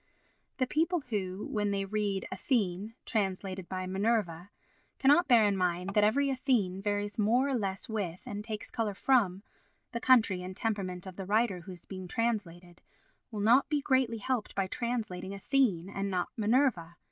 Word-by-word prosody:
The 255 - +2
people 330 +5 +1
who, 195 -1 -2
when 210 -1 -1
they 195 -1 -1
read 200 -1 -1
"Athene" 200 0 -1
translated 190 -3 -2
by 185 0 -3
"Minerva," 190 -3 -1 0.5
cannot 290 +6 +5
bear 235 -5 +6
in 200 -1 +2
mind 180 0 0
that 210 - +4
every 275 +6 +3
Athene 220 -8 0
varies 205 +1 -2
more 240 +6 +3
or 275 - 0
less 195 -5 -2
with, 195 -6 -3
and 205 0 -5
takes 215 -1 -5
colour 220 -4 -2
from, 200 -7 +2 0.5
the 235 - -3
country 225 -8 +4
and 185 +1 -7
temperament 195 -5 -2
of 185 -2 -9
the 195 - -5
writer 215 -2 +2
who 190 - -10
is 175 - -14
being 185 -1 -7
translated, 180 -6 -3 0.5
will 215 -3 -4
not 240 +8 +4
be 295 -1 +1
greatly 260 -4 +1
helped 235 +1 -2
by 195 - +1
translating 200 -4 -3
"Athene" 200 -5 +1
and 195 0 -3
not 180 -2 -1
"Minerva." 215 -7 +1
205 Hz, 170 wpm, -30 LUFS, 185-235 Hz, 0.5 s, bear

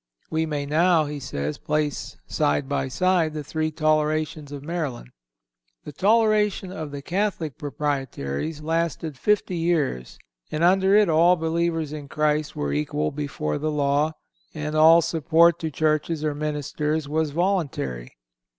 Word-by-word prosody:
"We 160 0 0
may 145 -2 -2
now," 160 +2 +3
he 145 0 -5
says, 75 - -4
"place 150 -1 -2
side 145 -2 0
by 140 -1 -1
side 170 +1 +1
the 150 - -4
three 155 +2 -2
tolerations 155 -1 0
of 140 -1 -7
Maryland." 150 - -4 0.7
The - - -8
toleration 210 +1 +2
of 160 -5 -5
the 140 -1 -7
(Catholic) 175 - -2
Proprietaries 140 - -3
lasted 165 -1 -1
fifty 195 +4 0
years, 155 - -1 0.3
and 155 - -1
under 190 +2 +4
it 210 -1 +5
all 170 +2 +5
believers 165 -2 -1
in 150 -2 -7
Christ 150 +1 0
were 70 -1 -2
equal 75 +1 -1
before 140 - -3
the 155 +2 -1
law, 145 +1 +1 0.4
and 150 0 -4
all 165 +2 +7
support 165 +1 +3
to 160 - -2
churches 155 +1 0
or 150 - 0
ministers 150 +1 -2
was 155 +1 0
voluntary. 145 - -1
155 Hz, 140 wpm, -24 LUFS, 145-165 Hz, 0.7 s, all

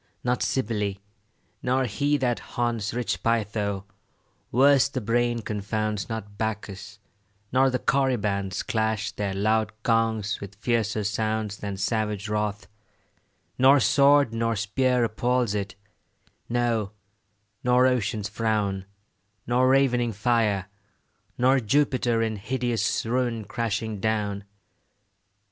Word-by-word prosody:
Not 125 0 0
Cybele, 105 -6 -1 0.7
nor 130 +1 +1
he 145 +6 +1
that 125 -3 0
haunts 115 -3 -2
Rich 115 -7 -2
Pytho, 105 -3 -1 0.7
worse 135 +2 +5
the 135 - -3
brain 120 +1 0
confounds, 105 0 -2
Not 105 -2 -6
Bacchus, 105 -2 -4 0.5
nor 130 +1 +4
the 125 - 0
Corybants 105 -7 0
Clash 110 -2 -1
their 100 -2 -3
loud 110 +2 +1
gongs 110 -3 +1
with 100 0 -8
fiercer 110 -1 0
sounds 110 0 -1
Than 100 -2 -5
savage 105 -1 -1
wrath; 105 -1 -2 0.9
nor 135 +2 +7
sword 140 -3 +4
nor 115 0 0
spear 125 +4 +1
Appals 120 0 0
it, 105 0 -3 0.7
no, 115 -4 0 0.7
nor 125 +1 +4
ocean's 110 -5 0
frown, 105 -3 -1 0.6
Nor 125 +2 +3
ravening 125 -3 +3
fire, 105 -3 +1 0.7
nor 130 +2 +4
Jupiter 125 -2 +1
In 110 -1 -2
hideous 120 +3 -1
ruin 120 -2 -1
crashing 110 -1 -3
down. 105 -1 -1
110 Hz, 110 wpm, -25 LUFS, 105-125 Hz, 0.9 s, nor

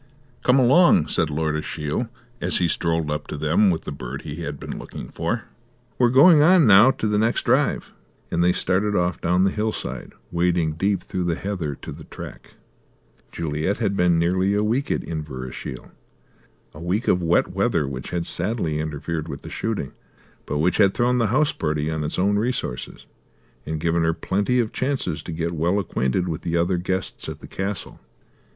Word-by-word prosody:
"Come 125 +1 +4
along," 170 - +5
said 85 -3 +1
Lord 75 +1 -1
Ashiel, 75 +8 -3 0.3
as - - 0
he 85 - +2
strolled 80 -2 0
up 75 0 -3
to - - -5
them 80 +7 +3
with 80 -3 -2
a - - -3
bird 65 -1 -6
he 75 +3 -6
had 75 -4 -5
been - - -6
looking - - -8
for, - - -2 0.6
"we're 120 -1 +5
going 145 +5 +7
on 175 0 +6
now 105 +3 +8
to 115 -4 -1
the 105 0 +1
next 110 +2 +1
drive," - - +1 0.4
and 85 - +2
they 90 - +4
started 100 +3 0
off 90 -2 0
down 90 +2 +2
the 95 - +3
hillside, 105 - -3 0.2
wading 85 -2 +1
deep 95 +5 0
through 90 -2 -3
the 85 -1 0
heather 90 -8 -3
to - - -9
the - - -10
track. - - -10 0.8
Juliet 80 +4 -2
had 100 -3 0
been 90 -2 +3
nearly 95 +4 +2
a 105 - +2
week 120 +6 0
at - - 0
Inverashiel. 65 -5 -6 0.8
A 75 - -11
week 95 +7 -1
of 90 - +3
wet 85 0 +2
weather 70 - 0
which 65 -1 -6
had 85 -1 -2
sadly 85 -5 0
interfered 80 +1 -3
with 70 -3 -6
the - - -8
shooting, 110 -12 -3 0.6
but - - -1
which 85 +4 +2
had 100 -2 +4
thrown 125 +1 +2
the 115 - +2
house 145 +7 +2
party 75 0 -2
on 80 -1 -2
its 75 - -3
own 100 +2 +2
resources 115 - -3 0.6
and 80 0 -2
given 85 +1 +1
her 80 0 +1
plenty 100 +8 0
of 115 -2 -1
chances 130 - -2
to - - -7
get 85 +1 -2
well 85 +4 0
acquainted 90 -3 0
with 85 0 -3
the 85 0 -1
other 85 +2 +1
guests 95 +1 -3
at - - -7
the - - -11
castle. 100 0 -4
85 Hz, 190 wpm, -23 LUFS, 80-105 Hz, 0.8 s, now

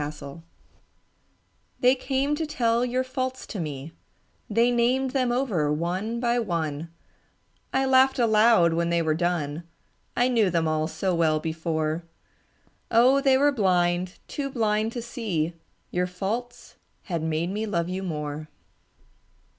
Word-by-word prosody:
Faults 145 +1 -7 1.4
They 250 +1 +5
came 270 +2 -1
to 315 +1 -2
tell 240 -5 +1
your 250 +1 0
faults 260 0 -4
to 205 - -6
me, 150 -2 -5 0.6
They 230 +3 +3
named 250 +2 +2
them 255 -3 +1
over 210 - 0
one 185 +9 -2
by 240 0 +1
one; 165 -6 -2 0.8
I 265 0 +1
laughed 265 0 +4
aloud 220 -7 +4
when 170 +1 0
they 170 0 +1
were 155 -1 +1
done, 165 -2 -1 0.6
I 245 - +4
knew 230 -6 +3
them 165 -2 +1
all 155 0 0
so 185 +3 -1
well 160 -2 +2
before, 160 0 -2 0.9
Oh, 255 +4 +5
they 270 -2 +4
were 290 +2 +4
blind, 180 -5 +1
too 280 -1 -3
blind 220 -3 0
to 240 - -4
see 205 - -2 0.4
Your 180 0 0
faults 220 +7 -5 0.3
had 170 -5 -3
made 160 +2 -1
me 215 +2 -2
love 170 -4 -1
you 185 +1 -3
more. 150 -3 -4
195 Hz, 140 wpm, -26 LUFS, 165-245 Hz, 1.4 s, They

